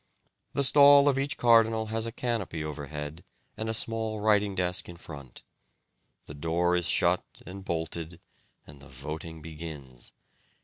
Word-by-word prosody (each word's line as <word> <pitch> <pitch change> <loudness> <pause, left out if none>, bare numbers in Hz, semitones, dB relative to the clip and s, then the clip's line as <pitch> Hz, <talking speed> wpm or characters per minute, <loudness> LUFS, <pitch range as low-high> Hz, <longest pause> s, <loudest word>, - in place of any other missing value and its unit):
The 140 - +1
stall 140 +1 +7
of 135 -2 +3
each 140 +1 -2
cardinal 115 -2 +4
has 115 0 -1
a - - -4
canopy 110 -10 -3
overhead 75 +1 -6 0.3
and 110 0 -4
a - - 0
small 110 -1 -1
writing 105 -2 +2
desk 90 0 -2
in 85 - -9
front. 70 -7 -11 0.8
The - - -9
door 85 +4 +1
is 90 -2 0
shut 85 +1 +2 0.2
and 95 +2 -8
bolted 85 -1 -4 0.5
and 70 - -14
the 70 - -15
voting 75 +4 -7
begins. 75 -6 -9
85 Hz, 145 wpm, -28 LUFS, 75-110 Hz, 0.8 s, stall